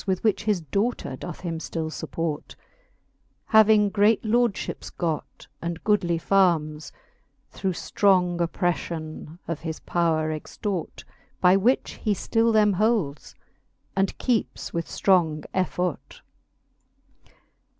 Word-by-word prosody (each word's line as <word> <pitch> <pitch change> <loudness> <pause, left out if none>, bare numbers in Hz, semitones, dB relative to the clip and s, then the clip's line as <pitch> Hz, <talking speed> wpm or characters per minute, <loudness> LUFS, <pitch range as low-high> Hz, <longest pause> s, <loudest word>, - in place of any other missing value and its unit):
With 190 -1 0
which 215 -2 +1
his 210 -5 +1
daughter 200 - -2
doth 175 +5 -8
him 165 -3 -3
ftill 160 -1 -4
fupport 160 -2 -3
j - - -13 0.9
Having 215 -2 +6
great 210 +2 +3
lordlhips 230 -1 0
got 165 -3 -3 0.2
and 170 0 -4
goodly 185 -5 +2
farmes, 165 -5 +1 0.6
Through 190 -1 -2
ftrong 180 -1 +2
oppreflion 165 -2 -2
of 165 -3 -3
his 160 -1 -5
powre 160 -2 0
extort; 185 +3 -5 0.4
By 180 0 +5
which 230 +7 +1
he 210 -3 +1
ftil 230 +3 +1
them 210 -2 +4
holds, 195 - 0 0.6
and 195 0 0
keepes 240 -4 -1
with 170 -1 -2
ftrong 165 -6 +2
effort. 180 -4 -2
180 Hz, 115 wpm, -25 LUFS, 165-210 Hz, 0.9 s, Having